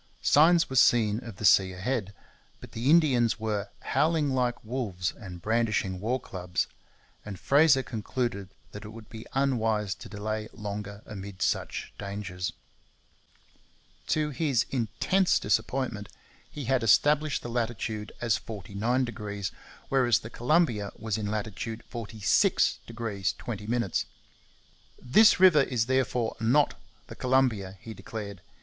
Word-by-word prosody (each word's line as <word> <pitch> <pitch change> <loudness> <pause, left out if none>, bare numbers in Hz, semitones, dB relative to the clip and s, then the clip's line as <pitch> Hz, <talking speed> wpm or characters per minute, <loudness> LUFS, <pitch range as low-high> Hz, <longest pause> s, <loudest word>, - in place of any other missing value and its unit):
Signs 165 +3 +5
were 130 - -6
seen 110 -3 +4
of 115 -4 -8
the 105 - -4
sea 95 -2 +5
ahead; 100 +1 -3 0.4
but - - -12
the 120 +4 -1
Indians 130 -9 +4
were 105 -2 -2
'howling 155 -2 +1
like 125 -3 -1
wolves 105 -8 -2
and 90 -5 -10
brandishing 110 -4 0
war 120 +6 -1
clubs,' 90 -5 -3 0.6
and 100 -3 -8
Fraser 140 -1 +4
concluded 110 -3 -3 0.2
that 105 - -9
it 105 - -8
would 110 0 -12
be 110 0 -9
unwise 115 -7 +1
to 115 - -12
delay 110 +1 -4
longer 105 -1 -6
amid 100 -2 -6
such - - -2
dangers. 100 -3 -4 1.6
To 150 -1 0
his 140 -5 +1
intense 135 - +1
disappointment 110 0 -1 0.4
he 145 -3 -7
had 130 +1 +2
established 145 - +3
the - - -5
latitude 115 -2 -3
as 115 -4 +1
49°, 105 -1 -3 0.4
whereas 125 -4 +3
the 115 - -9
Columbia 120 -6 +1
was 110 -1 -2
in 105 -1 -3
latitude 110 +2 -4
46° 110 -1 0
20'. 110 -2 -2 0.9
'This 215 - +5
river 180 -6 +7
is 125 -5 0
therefore 125 -2 0
not 125 +6 +3 0.3
the - - -10
Columbia,' 120 -7 +1
he 115 - -9
declared. 100 -1 -7
115 Hz, 125 wpm, -28 LUFS, 105-130 Hz, 1.6 s, river